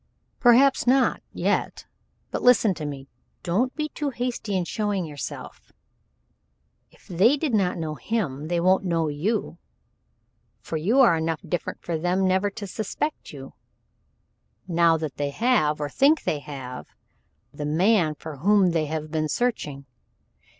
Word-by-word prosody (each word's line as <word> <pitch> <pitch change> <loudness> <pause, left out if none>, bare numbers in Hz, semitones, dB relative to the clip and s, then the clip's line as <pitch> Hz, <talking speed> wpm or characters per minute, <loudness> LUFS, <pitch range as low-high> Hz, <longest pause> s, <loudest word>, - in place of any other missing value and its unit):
"Perhaps 255 +2 +5
not 260 +1 +3
yet, - - -1 0.5
but - - -3
listen 240 -5 +5
to 155 -4 -6
me. 140 -1 -7 0.4
Don't 215 +9 0
be 305 0 -2
too 295 -1 -3
hasty 240 -5 -3
in 180 - -1
showing 205 -2 -2
yourself. 145 -5 -8 1.2
If - - -24
they 200 - +3
did 290 -4 -2
not 190 -5 +1
know 160 -2 -3
him, 150 -7 -3
they 175 +1 0
won't 185 +3 +3
know 165 -4 0
you 175 +4 -2 1.0
for - - -6
you 210 - +3
are 230 -10 +6
enough 160 0 -2
different 175 - -4
for 165 -2 -2
them 180 +3 +1
never 190 +2 +2
to 200 +1 -8
suspect 215 +10 -4
you, 135 -2 -10 1.1
now 170 -2 +3
that 155 -3 -5
they 145 0 -1
have, 155 - +1
or 145 - -2
think 280 - +3
they 150 - -1
have, 130 -3 -8 0.7
the 145 +1 -5
man 170 0 +2
for 150 0 -9
whom 195 +3 +3
they 160 -2 0
have 155 0 -4
been 155 -1 -1
searching. 150 - -2
175 Hz, 150 wpm, -24 LUFS, 155-225 Hz, 1.2 s, are